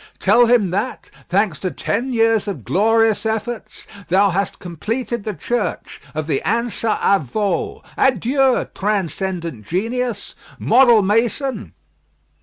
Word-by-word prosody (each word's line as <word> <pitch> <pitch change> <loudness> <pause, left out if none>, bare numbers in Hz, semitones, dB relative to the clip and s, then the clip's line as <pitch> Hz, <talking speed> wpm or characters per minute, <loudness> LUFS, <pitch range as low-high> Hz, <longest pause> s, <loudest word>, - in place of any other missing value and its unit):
Tell 240 0 +4
him 225 -7 +3
that, 210 +7 -3 0.2
thanks 190 -5 +1
to 185 - -2
ten 255 +7 -2
years 225 -3 +2
of 175 - -5
glorious 225 - +2
efforts, 220 +1 -4 0.2
thou 195 +2 +3
hast 195 +2 -1
completed 225 - -4
the 215 - -2
church 240 +2 -3
of 155 0 -2
the 145 -3 -1
Ansa 230 0 0
à 200 -3 +3
Veau. 195 - -2
Adieu! 260 +2 +2
transcendent 185 - -2
genius, 235 - -2 0.2
model 240 -5 +5
mason!" 230 +6 -1
215 Hz, 120 wpm, -19 LUFS, 190-235 Hz, 0.2 s, model